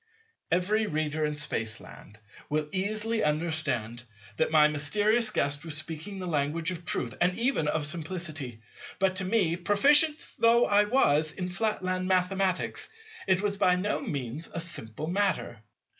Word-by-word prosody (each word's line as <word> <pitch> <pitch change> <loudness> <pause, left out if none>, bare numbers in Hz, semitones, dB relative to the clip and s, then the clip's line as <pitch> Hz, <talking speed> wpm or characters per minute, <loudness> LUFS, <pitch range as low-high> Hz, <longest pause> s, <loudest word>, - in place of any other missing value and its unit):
Every 205 +5 +1
reader 155 -2 -1
in 150 0 -2
Spaceland 115 -7 -4 0.3
will 150 0 -1
easily 215 +4 -1
understand 150 -7 -1 0.3
that 160 - +1
my 155 -1 +6
mysterious 205 +10 +2
Guest 145 +1 -1
was 160 -3 -3
speaking 160 +5 -6
the 185 - -5
language 160 +1 -1
of 175 -1 -7
truth 120 -8 -3
and 180 +1 +2
even 235 - 0
of 150 0 0
simplicity. 155 -7 -4 0.4
But 190 -1 +1
to 185 - -2
me, 185 -5 +1
proficient 290 - +5 0.2
though 235 +1 +5
I 205 0 +4
was 155 - +3
in 180 -1 -4
Flatland 185 -2 -1
Mathematics, 185 0 0 0.4
it 185 -1 +3
was 200 -1 -1
by 180 -2 +3
no 190 +3 -1
means 145 - -4
a - - -4
simple 155 -6 -3
matter. 180 - 0
175 Hz, 145 wpm, -28 LUFS, 150-200 Hz, 0.4 s, my